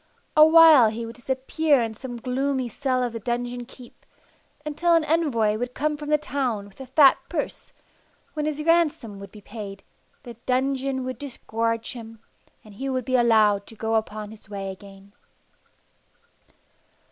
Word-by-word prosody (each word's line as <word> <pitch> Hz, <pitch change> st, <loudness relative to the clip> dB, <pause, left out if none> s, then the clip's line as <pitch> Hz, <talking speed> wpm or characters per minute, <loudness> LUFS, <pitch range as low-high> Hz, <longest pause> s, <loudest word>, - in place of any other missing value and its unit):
A 305 Hz, -, +8 dB
while 315 Hz, -7 st, +8 dB
he 230 Hz, +2 st, -5 dB
would 230 Hz, +1 st, -9 dB
disappear 270 Hz, +4 st, +1 dB
in 225 Hz, -1 st, -4 dB
some 245 Hz, +2 st, -8 dB
gloomy 260 Hz, +1 st, -1 dB
cell 255 Hz, +2 st, -1 dB
of 240 Hz, -2 st, -3 dB
the 230 Hz, -, -4 dB
dungeon 245 Hz, +1 st, -3 dB
keep, 250 Hz, -2 st, -15 dB, 0.6 s
until 335 Hz, +3 st, +2 dB
an 330 Hz, -, +3 dB
envoy 285 Hz, -10 st, +1 dB
would 245 Hz, +1 st, -4 dB
come 300 Hz, +1 st, 0 dB
from 295 Hz, 0 st, -7 dB
the 300 Hz, -, +4 dB
town 255 Hz, -8 st, -2 dB
with 205 Hz, +6 st, -15 dB
a 265 Hz, -, -8 dB
fat 280 Hz, -2 st, +6 dB
purse, -, -, -4 dB, 0.6 s
when 300 Hz, -1 st, -2 dB
his 305 Hz, 0 st, -3 dB
ransom 305 Hz, -11 st, +1 dB
would 200 Hz, -, -10 dB
be 210 Hz, -, -13 dB
paid, 200 Hz, -2 st, -9 dB, 0.4 s
the 240 Hz, -, -9 dB
dungeon 265 Hz, +1 st, 0 dB
would 255 Hz, 0 st, -5 dB
disgorge 230 Hz, -4 st, -3 dB
him, 225 Hz, -2 st, -10 dB, 0.5 s
and 215 Hz, -, -15 dB
he 270 Hz, +7 st, -5 dB
would 255 Hz, -2 st, -2 dB
be 255 Hz, -, 0 dB
allowed 215 Hz, -4 st, +3 dB
to 225 Hz, -, -12 dB
go 220 Hz, +1 st, -2 dB
upon 215 Hz, -1 st, -2 dB
his 220 Hz, -1 st, -15 dB
way 195 Hz, -1 st, -5 dB
again. 195 Hz, 0 st, -14 dB
245 Hz, 165 wpm, -24 LUFS, 220-280 Hz, 0.6 s, A